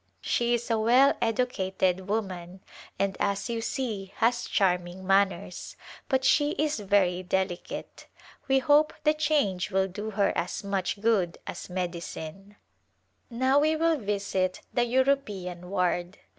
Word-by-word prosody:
She 240 0 +1
is 235 0 -4
a 225 - +2
well 250 +6 +5
educated 190 -6 0
woman, 185 -4 -3 0.4
and, 195 -1 0
as 200 +4 -1
you 230 -1 -2
see, 215 -6 -3
has 235 +1 +1
charming 180 -1 0
manners, 195 -1 0 0.3
but 265 -1 +1
she 290 +3 +3
is 300 -5 0
very 190 -3 +2
delicate. 185 -1 -3 0.4
We 270 0 +4
hope 295 +3 +4
the 305 0 +4
change 295 - +1
will 190 -1 +1
do 205 +3 -6
her 205 -2 +1
as 175 +4 -2
much 195 0 -2
good 205 -7 +1
as - - -7
medicine. 180 +1 -5 0.7
Now 260 +3 +2
we 310 +2 +2
will 325 0 +2
visit 195 -3 -1
the 240 -1 +2
European 215 -9 0
ward. 180 0 -1
200 Hz, 135 wpm, -27 LUFS, 185-250 Hz, 0.7 s, well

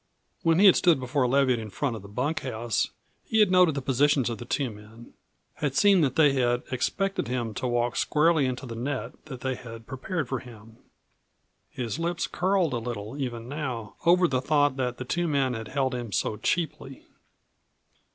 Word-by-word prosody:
When 165 0 +3
he 200 - +5
had 190 - +8
stood 170 -6 +4
before 130 +1 0
Leviatt 130 -2 +3
in 110 -1 -6
front 130 +3 -2
of 110 - -7
the 100 - -11
bunkhouse, 120 -2 -2 0.3
he 220 - 0
had 210 -4 +5
noted 180 -5 +5
the 140 - -3
positions 135 -1 +2
of 115 - -5
the 120 - -7
two 130 0 -1
men; 110 +3 -14 0.4
had 145 -3 -2
seen 200 0 +5
that 135 -4 +1
they 150 -3 +5
had 120 -2 +1
expected 195 - -1
him 120 -3 -2
to 130 - -3
walk 120 0 0
squarely 155 -2 +3
into 130 +1 -4
the 120 - -6
net 125 0 -3
that 130 -5 -8
they 130 0 -1
had 115 -2 -10
prepared 145 +4 -4
for 130 0 -2
him. 115 -2 -14 0.9
His 120 +3 -4
lips 170 +1 -1
curled 185 -5 +1
a 120 - 0
little 115 -1 -5
even 120 -3 -4
now 130 -7 -4
over 175 +1 +5
the 130 -4 0
thought 145 -1 +2
that 125 -2 -2
the 130 - -6
two 175 +6 -1
men 135 -4 +1
had 110 -2 -5
held 135 0 -1
him 120 -3 -4
so 105 - 0
cheaply. 155 -5 -2
130 Hz, 190 wpm, -27 LUFS, 120-150 Hz, 0.9 s, had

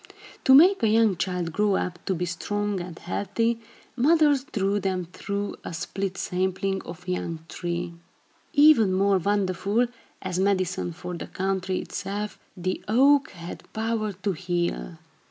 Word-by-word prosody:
To 265 - +8
make 370 +7 +7
a 225 - +3
young 220 -2 +4
child 180 -1 -2
grow 205 +3 +2
up 180 -1 -3
to 190 - +1
be 175 +1 -1
strong 205 +3 -2
and 175 -1 -8
healthy, 230 +5 -1 0.4
mothers 290 +1 +4
drew 205 -8 0
them 185 -2 -1
through 200 0 -3
a 170 - -5
split 195 +3 -3
sapling 190 +1 -1
or 170 - -8
young 170 -3 -3
tree. 175 0 -4 0.6
Even 290 -9 +6
more 195 0 +3
wonderful, 200 +4 +1 0.3
as 185 -1 -3
medicine 185 -3 +1
for 180 +1 -7
the 170 - -6
country 190 0 -1
itself, 200 +2 -4 0.2
the 185 +1 -2
oak 270 +6 +5
had 170 0 -10
power 220 -1 -1
to 195 +2 -2
heal. 175 - -2
195 Hz, 145 wpm, -26 LUFS, 180-215 Hz, 0.6 s, To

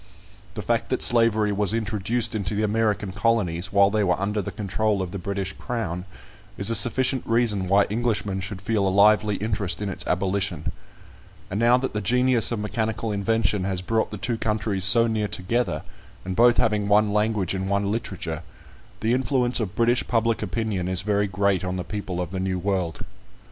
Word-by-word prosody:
The 105 - -5
fact 120 0 -1
that 130 - +1
slavery 115 -3 +3
was 105 +1 0
introduced 110 +1 -1
into 105 -1 -2
the 105 - 0
American 105 -2 0
colonies, 95 -4 0
while 100 0 +4
they 105 0 +1
were 90 -2 +1
under 105 +2 -1
the - - -5
control 105 +1 -1
of 95 -2 -3
the 100 - -5
British 100 +1 -4
Crown, 90 -8 -4 0.5
is 100 +3 +2
a - - +1
sufficient 130 +4 +2
reason 115 -5 +1
why 100 +2 +4
Englishmen 105 -3 -1
should 95 0 -7
feel 105 -2 +1
a - - +3
lively 105 +1 +4
interest 100 -3 -1
in 105 -1 -3
its 95 - -5
abolition; 95 +2 -1 0.8
and 100 - -2
now 120 +2 +5
that 130 +1 -3
the 105 - -2
genius 125 +2 +3
of 120 - -1
mechanical 110 +1 -2
invention 105 -1 0
has 95 -1 -2
brought 110 +3 0
the 105 - -7
two 115 +3 -3
countries 105 -3 0
so 115 +4 +7
near 110 -2 -1
together, 100 +2 -2 0.4
and 95 0 -3
both 120 +2 +5
having 105 -2 +1
one 105 0 +3
language 105 -3 0
and 95 0 -3
one 100 0 0
literature, 90 -7 -4 0.6
the 110 +2 +1
influence 130 -1 +1
of 100 -4 -3
British 120 +2 +1
public 115 -1 +1
opinion 105 -3 -2
is 95 0 0
very 105 0 +1
great 100 -1 0
on 90 0 -2
the 90 - -3
people 90 0 -5
of 90 -1 -3
the 95 - -4
New 95 0 -1
World. 90 -2 -2
105 Hz, 190 wpm, -24 LUFS, 95-115 Hz, 0.8 s, so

